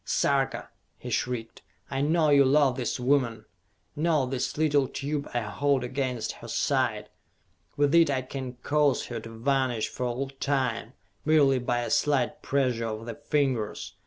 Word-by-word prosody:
"Sarka," -, -, 0 dB, 0.3 s
he -, -, -7 dB
shrieked, 120 Hz, -2 st, -3 dB, 0.3 s
"I 135 Hz, 0 st, -1 dB
know 155 Hz, +1 st, +3 dB
you 140 Hz, -1 st, +7 dB
love 135 Hz, -1 st, +4 dB
this 125 Hz, -1 st, -2 dB
woman! 125 Hz, -4 st, +1 dB, 0.5 s
Note 150 Hz, -4 st, +1 dB
this 130 Hz, +1 st, -2 dB
little 145 Hz, -3 st, +2 dB
tube 145 Hz, +2 st, -4 dB
I 120 Hz, -, -1 dB
hold 130 Hz, +5 st, 0 dB
against 125 Hz, -2 st, -2 dB
her -, -, -11 dB
side. -, -, 0 dB, 0.7 s
With 145 Hz, 0 st, +2 dB
it 170 Hz, -2 st, +6 dB
I 130 Hz, -2 st, 0 dB
can 130 Hz, -1 st, -6 dB
cause 145 Hz, -2 st, +2 dB
her 120 Hz, -2 st, -4 dB
to 115 Hz, -, -10 dB
vanish 120 Hz, 0 st, 0 dB
for 125 Hz, -, -3 dB
all 130 Hz, +3 st, -3 dB
time, 130 Hz, -4 st, -1 dB, 0.3 s
merely 145 Hz, -4 st, +4 dB
by 120 Hz, 0 st, -1 dB
a 120 Hz, -, -4 dB
slight 145 Hz, -3 st, +1 dB
pressure 125 Hz, -4 st, 0 dB
of 110 Hz, 0 st, -5 dB
the 115 Hz, -, -5 dB
fingers! 135 Hz, -6 st, -1 dB
135 Hz, 160 wpm, -27 LUFS, 120-145 Hz, 0.7 s, you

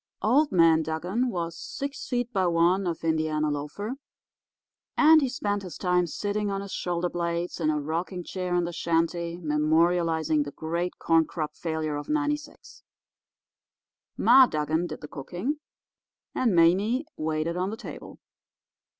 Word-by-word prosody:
"Old 280 Hz, +8 st, +3 dB
Man 165 Hz, -3 st, +5 dB
Dugan 180 Hz, +11 st, -1 dB
was 170 Hz, -5 st, -3 dB
six 285 Hz, -, -6 dB
feet 245 Hz, -1 st, -1 dB
by 190 Hz, -3 st, +2 dB
one 175 Hz, +3 st, +2 dB
of 165 Hz, -2 st, -3 dB
Indiana 155 Hz, -1 st, 0 dB
loafer, 150 Hz, -, -4 dB, 1.0 s
and 315 Hz, 0 st, +7 dB
he 270 Hz, -, 0 dB
spent 205 Hz, -4 st, -2 dB
his 185 Hz, -3 st, -8 dB
time 180 Hz, -1 st, +1 dB
sitting 205 Hz, +4 st, -2 dB
on 195 Hz, 0 st, -2 dB
his 200 Hz, -1 st, -8 dB
shoulder 175 Hz, 0 st, -1 dB
blades 170 Hz, 0 st, -3 dB
in 155 Hz, -2 st, +1 dB
a 150 Hz, -1 st, +1 dB
rocking 170 Hz, +5 st, -3 dB
chair 180 Hz, 0 st, -3 dB
in 175 Hz, -, +2 dB
the 170 Hz, 0 st, -4 dB
shanty 170 Hz, 0 st, -1 dB
memorialising 160 Hz, 0 st, +2 dB
the 145 Hz, -, -6 dB
great 170 Hz, +3 st, -3 dB
corn 165 Hz, -1 st, +3 dB
crop 155 Hz, -2 st, -5 dB
failure 160 Hz, -3 st, -2 dB
of 145 Hz, -, -7 dB
'96. 295 Hz, 0 st, -3 dB, 1.4 s
Ma 255 Hz, +2 st, +7 dB
Dugan 155 Hz, +1 st, -1 dB
did -, -, -8 dB
the 150 Hz, -, -7 dB
cooking, 180 Hz, -, -4 dB, 0.7 s
and 230 Hz, -7 st, +1 dB
Mame 195 Hz, -, +3 dB
waited 155 Hz, +2 st, -2 dB
on 185 Hz, +2 st, -1 dB
the 220 Hz, -, -5 dB
table. -, -, -9 dB
175 Hz, 150 wpm, -27 LUFS, 160-205 Hz, 1.4 s, and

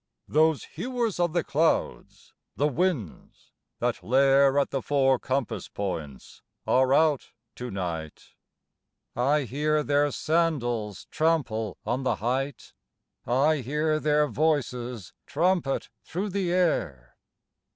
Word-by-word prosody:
Those 155 Hz, 0 st, +3 dB
hewers 235 Hz, -, -3 dB
of 175 Hz, -2 st, +1 dB
the 175 Hz, -2 st, +1 dB
clouds, 160 Hz, +3 st, -1 dB, 0.2 s
the 145 Hz, -, +2 dB
winds, 150 Hz, -, -3 dB, 0.3 s
that -, -, -2 dB
lair 135 Hz, +2 st, +4 dB
At 140 Hz, -, +2 dB
the 135 Hz, -, -1 dB
four 135 Hz, -2 st, +2 dB
compass 125 Hz, -7 st, -2 dB
points, 80 Hz, -9 st, -6 dB, 0.2 s
are 130 Hz, 0 st, +3 dB
out 150 Hz, -1 st, +3 dB, 0.3 s
to 125 Hz, 0 st, -5 dB
night; 85 Hz, -6 st, -5 dB, 0.9 s
I 140 Hz, +5 st, +2 dB
hear 150 Hz, +4 st, 0 dB
their 145 Hz, 0 st, +2 dB
sandals 125 Hz, -, -1 dB
trample 130 Hz, -, 0 dB
on 125 Hz, +2 st, -1 dB
the 130 Hz, -, 0 dB
height, 130 Hz, +3 st, -3 dB, 0.5 s
I 140 Hz, +6 st, +3 dB
hear 150 Hz, +4 st, 0 dB
their 150 Hz, 0 st, +2 dB
voices 125 Hz, -, -1 dB
trumpet 165 Hz, -2 st, 0 dB
through 190 Hz, +5 st, -3 dB
the 185 Hz, -2 st, -1 dB
air. 80 Hz, -, 0 dB
140 Hz, 115 wpm, -26 LUFS, 120-155 Hz, 0.9 s, lair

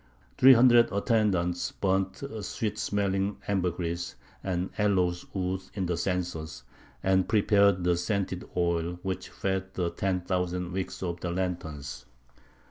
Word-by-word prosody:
Three 130 Hz, +1 st, +9 dB
hundred 120 Hz, -2 st, +6 dB
attendants 100 Hz, -5 st, +1 dB
burnt 95 Hz, +2 st, -1 dB, 0.2 s
sweet 105 Hz, +1 st, -3 dB
smelling 100 Hz, 0 st, 0 dB
ambergris 90 Hz, -3 st, -1 dB, 0.3 s
and 90 Hz, -1 st, -2 dB
aloes 90 Hz, -4 st, +1 dB
wood 95 Hz, 0 st, -2 dB
in 95 Hz, -3 st, -1 dB
the 85 Hz, 0 st, 0 dB
censers, 80 Hz, -7 st, -3 dB, 0.4 s
and 95 Hz, -1 st, +2 dB
prepared 100 Hz, -3 st, +4 dB
the 90 Hz, 0 st, +3 dB
scented 95 Hz, +1 st, -2 dB
oil 85 Hz, 0 st, 0 dB
which 95 Hz, -1 st, -3 dB
fed 95 Hz, 0 st, -3 dB
the 85 Hz, -2 st, -1 dB
ten 90 Hz, +1 st, -1 dB
thousand 90 Hz, 0 st, -2 dB
wicks 95 Hz, +1 st, -4 dB
of 85 Hz, -1 st, -3 dB
the 90 Hz, -, -3 dB
lanterns. 85 Hz, -6 st, -4 dB
95 Hz, 130 wpm, -28 LUFS, 90-100 Hz, 0.4 s, Three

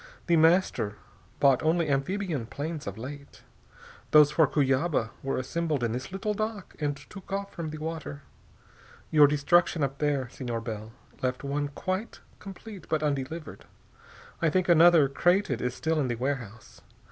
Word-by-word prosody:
The 170 Hz, -, +3 dB
Master 160 Hz, -, +3 dB, 0.4 s
bought 135 Hz, -3 st, +4 dB
only 160 Hz, +1 st, +2 dB
amphibian 145 Hz, -, -1 dB
planes 150 Hz, +2 st, -5 dB
of 100 Hz, +1 st, -5 dB
late. 140 Hz, +4 st, -9 dB, 0.7 s
Those 150 Hz, -1 st, +7 dB
for 160 Hz, -1 st, +4 dB
Cuyaba 135 Hz, -3 st, +1 dB
were 135 Hz, -, -2 dB
assembled 155 Hz, 0 st, -2 dB
in 115 Hz, -, 0 dB
this 125 Hz, +6 st, -5 dB
little 210 Hz, +3 st, -2 dB
dock 215 Hz, -2 st, -4 dB
and 145 Hz, -2 st, -1 dB
took 195 Hz, +4 st, -13 dB
off 200 Hz, 0 st, -3 dB
from 165 Hz, -2 st, -5 dB
the 155 Hz, -, -6 dB
water. 155 Hz, -2 st, -6 dB, 0.9 s
Your 150 Hz, -2 st, +7 dB
destruction 150 Hz, +2 st, +2 dB
up 140 Hz, 0 st, -2 dB
there, 145 Hz, -4 st, 0 dB
Senor 120 Hz, -3 st, -4 dB
Bell, 110 Hz, -1 st, -6 dB, 0.3 s
left 130 Hz, +1 st, -2 dB
one 145 Hz, +1 st, -1 dB
quite 185 Hz, +9 st, -4 dB, 0.2 s
complete 195 Hz, -1 st, -10 dB
but 155 Hz, -1 st, 0 dB
undelivered. 145 Hz, +2 st, -3 dB, 0.8 s
I 165 Hz, -, +3 dB
think 185 Hz, +3 st, +1 dB
another, 170 Hz, -3 st, +6 dB
crated, 175 Hz, -, +1 dB
is 125 Hz, 0 st, -2 dB
still 160 Hz, 0 st, 0 dB
in 140 Hz, -, +1 dB
the 120 Hz, -, -1 dB
warehouse. 120 Hz, -4 st, -5 dB
150 Hz, 155 wpm, -28 LUFS, 135-170 Hz, 0.9 s, Those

